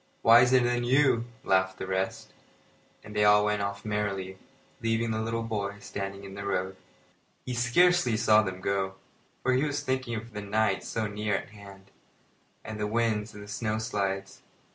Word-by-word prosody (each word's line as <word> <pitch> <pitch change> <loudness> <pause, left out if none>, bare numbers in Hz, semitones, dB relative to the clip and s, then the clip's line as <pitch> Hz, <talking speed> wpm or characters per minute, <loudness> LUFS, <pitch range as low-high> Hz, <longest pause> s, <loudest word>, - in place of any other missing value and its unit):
"Wiser 125 +3 +7
than 120 0 +1
you," 130 -2 +3 0.2
laughed 95 -2 +2
the - - -5
rest; 95 0 -3 0.7
and 105 - -11
they 105 - +3
all 105 0 +6
went 105 0 0
off 100 +2 -4
merrily, 100 -3 -2 0.4
leaving 115 0 0
the 110 0 -1
little 115 +1 -2
boy 100 -3 -3
standing 100 -1 -6
in 95 -1 -9
the 100 0 -6
road. 95 -1 -2 0.7
He 125 - -3
scarcely 125 +1 +3
saw 110 -1 +5
them 95 -3 -5
go, 95 0 -1 0.5
for 130 - +2
he 130 +3 +2
was 145 -1 -1
thinking 130 -2 -2
of 115 +1 -7
the 105 - -5
night 100 -1 0
so 110 -1 -2
near 105 0 -1
at - - -4
hand, 100 -2 -14 0.7
and 110 -1 -7
the 105 - -1
winds 110 -1 0
and 105 - -9
the - - -12
snow 110 +1 -2
slides. 100 -3 -3
105 Hz, 175 wpm, -28 LUFS, 100-115 Hz, 0.7 s, Wiser